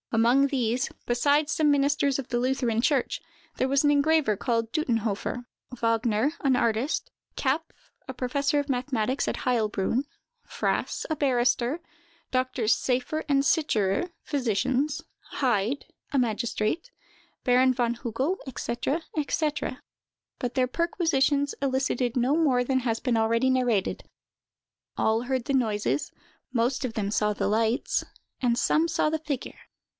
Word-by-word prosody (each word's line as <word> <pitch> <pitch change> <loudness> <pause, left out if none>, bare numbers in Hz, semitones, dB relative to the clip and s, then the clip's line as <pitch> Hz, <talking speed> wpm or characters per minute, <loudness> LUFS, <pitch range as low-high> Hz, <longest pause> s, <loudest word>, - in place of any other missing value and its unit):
Among 240 +5 +4
these, 250 -2 0 0.2
besides 285 +5 +2
some 305 -2 +3
ministers 285 -1 +2
of 265 - -5
the 240 - -1
Lutheran 250 -3 +1
church, 270 0 +1 0.4
there 260 - +1
was 275 +1 +3
an 290 - +4
engraver 290 -5 +3
called 230 +2 -1
Duttenhofer; 235 -4 -1 0.3
Wagner, 230 +2 +1
an 265 -4 +3
artist; 235 - 0 0.3
Kapff, 280 +4 +1 0.5
professor 280 +4 +1
of 285 - -2
mathematics 255 -1 -1
at - - -3
Heilbroun; 230 0 +1 0.4
Frass, - - -2
a 315 - 0
barrister; 255 0 +1 0.5
Doctors 255 -3 +1
Seyffer 255 +5 -1
and 275 -1 +3
Sicherer, 255 - +1
physicians; 260 +2 0 0.4
Heyd, 245 0 +1 0.3
a 280 - 0
magistrate; 235 - -1 0.5
Baron 255 +1 +4
von 240 -2 0
Hugel, 260 - -2 0.2
&c., 290 +4 -2
&c.: 305 -2 -1 0.6
but 245 -1 -3
their 255 -1 +2
perquisitions 285 -2 +1
elicited 260 -2 0
no 250 +4 +2
more 275 -7 +3
than 260 +1 +1
has 230 -3 -1
been 250 -3 0
already 230 +3 +2
narrated—all 230 -1 -2
heard 255 -1 -2
the 275 - -1
noises, 225 +1 0 0.4
most 255 +2 0
of 250 -3 -2
them 205 -2 -1
saw 210 0 +2
the - - -1
lights, 225 +3 +1 0.4
and 240 -2 +2
some 315 +6 +2
saw 310 - +1
the 315 0 -1
figure. 290 -4 -5
255 Hz, 130 wpm, -27 LUFS, 230-285 Hz, 0.6 s, Among